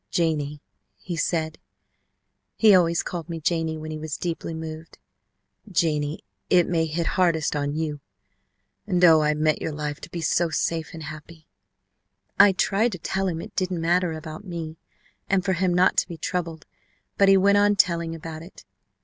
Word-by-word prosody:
'Janie,' 150 -3 -1 0.3
he 175 - -6
said 160 -1 -1 1.0
he 215 -2 +6
always 170 -2 +3
called 170 -3 -6
me 165 -1 -4
Janie 160 0 -1
when 155 0 -7
he 155 - -5
was 155 -1 -4
deeply 165 -1 -4
moved 160 0 -8 0.7
'Janie, 155 -4 0 0.3
it 180 -2 +4
may 165 -2 +1
hit 165 +2 -2
hardest 165 -5 +1
on 145 0 -1
you, 155 -2 -3 0.9
and 180 -3 +3
oh, 160 -2 +7
I 150 0 +2
meant 155 0 +1
your 160 - -2
life 150 -1 -4
to - - -9
be 175 - -5
so 165 +1 +1
safe 165 0 -2
and 160 - -8
happy!' 155 +2 -10 0.9
"I 200 0 +8
tried 200 +4 +1
to - - -4
tell 190 +3 -2
him 165 -2 -3
it - - -12
didn't 185 -2 -1
matter 175 +1 +1
about 155 +2 -8
me, 165 -4 -6 0.5
and 190 -1 +1
for 190 - +2
him 185 0 +1
not 180 +1 +3
to - - +3
be 170 -3 -8
troubled, 165 -3 -4 0.5
but 200 -1 +6
he 195 - +7
went 200 +1 +4
on 205 0 +4
telling 170 -3 +1
about 160 -1 -8
it. 165 - -14
165 Hz, 175 wpm, -24 LUFS, 155-180 Hz, 1.0 s, I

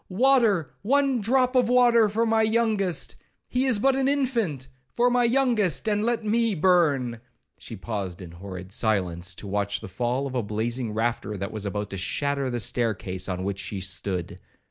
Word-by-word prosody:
—Water, 215 - +3
one 270 +2 +2
drop 255 +4 +2
of 250 -2 +3
water 240 -3 +5
for 225 +3 +1
my 225 0 +2
youngest—he 220 +2 -1
is 255 -5 +3
but 265 +5 +3
an 270 0 +1
infant—for 230 - -1
my 245 0 +3
youngest, 235 - +1
and 210 -1 +1
let 230 -1 -1
me 225 0 +1
burn!' 150 -9 +2 0.4
She - - -8
paused 95 -3 -5
in 90 -3 -9
horrid 95 +1 -9
silence, 90 -5 -1
to - - -9
watch 100 +1 -1
the - - -8
fall 120 +8 -2
of 135 - -5
a 125 - 0
blazing 115 +3 -3
rafter 110 -1 -2
that 100 +1 -4
was 105 -2 -4
about 105 +1 -4
to 95 - -4
shatter 140 +7 -1
the 120 -1 -2
stair 115 +1 0
case 95 0 -5
on 90 0 -3
which 100 0 -3
she 100 0 -4
stood. 90 -1 -3
135 Hz, 175 wpm, -25 LUFS, -, 0.4 s, water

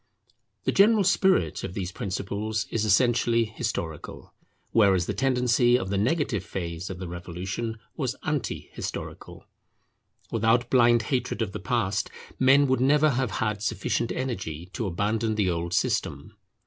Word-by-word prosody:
The - - +1
general 210 +1 +5
spirit 190 - +2
of 90 - -5
these 95 -2 -3
principles 100 +3 -3
is 110 -1 0
essentially 115 +2 +3
historical, 110 -8 -5 0.4
whereas 95 -5 +4
the - - -2
tendency 125 -2 +3
of 95 -4 -4
the 100 - 0
negative 125 - 0
phase 85 -2 -5
of 95 - -6
the 90 0 -6
revolution 90 +6 -5 0.2
was 130 -5 -2
anti 145 - -3
historical. - - -7 0.9
Without 115 +2 +2
blind 120 -2 +5
hatred 125 -3 0
of 100 - -4
the - - -5
past, - - -1 0.3
men 135 +2 +6
would 130 -2 +1
never 150 +3 +4
have 125 -1 0 0.2
had 105 -1 -2
sufficient 115 +2 -1
energy 90 - -4
to 115 -5 -2
abandon 105 +5 -1
the 100 -4 +1
old 85 0 -3
system. - - -1
110 Hz, 145 wpm, -26 LUFS, 95-125 Hz, 0.9 s, men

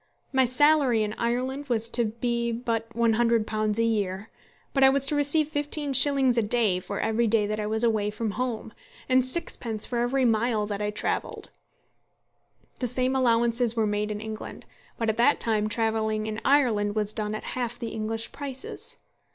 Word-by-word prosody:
My 265 -1 +4
salary 260 -2 +3
in 210 0 -3
Ireland 255 +4 -2
was 230 -2 +1
to 235 0 +2
be 235 +1 -2
but 230 -1 -3
£100 225 -2 +1
a 230 - +2
year; 205 -2 -2 0.4
but 270 - +3
I 265 - +8
was 275 0 +1
to 295 - -1
receive 290 +1 +3
fifteen 295 -1 -3
shillings 265 -2 +5
a - - +3
day 210 -4 +1
for 200 +2 -6
every 225 +1 +1
day 215 -1 +2
that 215 +1 -3
I 210 - -2
was 220 +2 +1
away 215 -3 +1
from 215 +1 -3
home, 225 -2 -4 0.3
and 255 -1 +3
sixpence 250 -6 -1
for 240 - -3
every 250 +2 +1
mile 225 -1 +1
that 205 -1 -4
I 210 - -1
travelled. 210 - -4 1.3
The 250 - -1
same 255 +2 +1
allowances 235 -1 +3
were 225 -2 +1
made 210 0 -1
in 210 -1 -4
England; 220 -1 -8 0.3
but 230 - -2
at 220 0 0
that 245 +5 +3
time 215 -2 +1
travelling 220 -1 -1
in 215 0 -5
Ireland 225 -7 +2
was 210 -1 -1
done 215 -1 0
at - - -6
half 240 -1 -3
the 235 -2 -5
English 225 +1 -4
prices. 270 -2 -6
230 Hz, 180 wpm, -26 LUFS, 215-255 Hz, 1.3 s, I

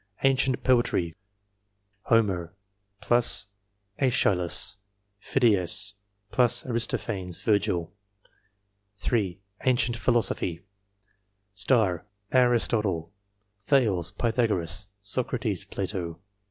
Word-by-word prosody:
Ancient 135 -1 +2
poetry... 120 -10 +2 0.9
HOMER, 95 -6 +1 0.5
*JEschylus, 100 - +1 0.4
Phidias, 100 -5 +2 0.7
*Aristophanes, 105 -6 -1
Virgil. 95 -6 0 1.0
3. 100 -5 -1 0.3
Ancient 120 -2 +2
philosophy. 100 -8 0 1.7
ARISTOTLE, 110 -8 +2 0.6
Thales, 105 - +2
Pythagoras, 100 -7 -1 0.2
Socrates, 105 -2 -1
Plato. 95 -4 -4
105 Hz, 55 wpm, -26 LUFS, 90-120 Hz, 1.7 s, Ancient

